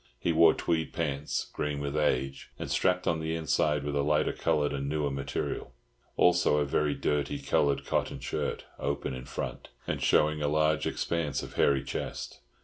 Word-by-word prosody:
He 85 - 0
wore 80 0 +6
tweed 80 -1 -1
pants, 75 -3 -2
green 75 -1 -2
with 70 0 -3
age, 70 -3 0
and - - -5
strapped 90 0 +2
on 80 - +1
the 80 +1 -2
inside 75 -2 +1
with 75 0 -2
a 70 - +2
lighter 75 +1 +2
coloured 75 -1 +1
and 70 0 -2
newer 75 -1 0
material; 70 -2 -3 0.4
also 90 -4 +4
a 75 - +2
very 75 +1 +1
dirty 75 -1 0
coloured 70 0 +1
cotton - - -1
shirt, - - -3
open 70 -2 -2
in 65 0 -7
front, 60 -2 -5 0.2
and - - -2
showing 75 0 +3
a 75 - +1
large 80 +1 +2
expanse 85 -4 -1
of - - -8
hairy 70 -1 +3
chest. - - -5
75 Hz, 175 wpm, -29 LUFS, 70-80 Hz, 0.4 s, wore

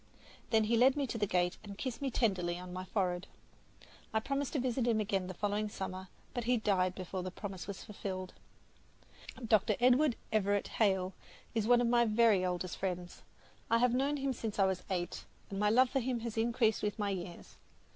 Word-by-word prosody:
Then 220 -1 +4
he 230 +2 +2
led 255 +3 +5
me 285 - +1
to 235 -3 -4
the 205 - +1
gate 180 -1 +1
and 200 -1 -9
kissed 255 +1 -4
me 275 - 0
tenderly 185 -8 0
on 180 0 -8
my 185 0 -4
forehead. 185 -2 -1 0.8
I 220 - +2
promised 275 +3 -2
to 290 - +1
visit 250 -1 0
him 225 -2 +3
again 195 -3 0
the 185 - -6
following 210 +2 -1
summer, 190 -1 -5 0.3
but 245 -2 -3
he 245 +1 +3
died 190 -4 +1
before 185 0 -4
the 185 - -4
promise 190 0 -7
was 200 -2 -6
fulfilled. 190 -3 -5 1.1
Dr. 215 -1 +4
Edward 255 +2 +4 0.2
Everett 205 -2 +1
Hale 190 -3 +1 0.4
is 220 -2 0
one 245 0 +6
of 240 - +2
my 235 0 +4
very 215 -3 +4
oldest 180 0 -2
friends. 180 -2 -4 0.5
I 230 - +4
have 240 0 +3
known 275 +3 +1
him 275 -1 -1
since 225 -3 -4
I 195 - +5
was 190 -1 0
eight, 175 -2 -3 0.3
and 195 - -3
my 210 0 +3
love 250 +3 +4
for 270 - +2
him 245 -1 -2
has 230 -1 -4
increased 225 -1 +2
with 210 +1 -1
my 205 -2 0
years. 180 -2 -7
210 Hz, 200 wpm, -33 LUFS, 185-235 Hz, 1.1 s, one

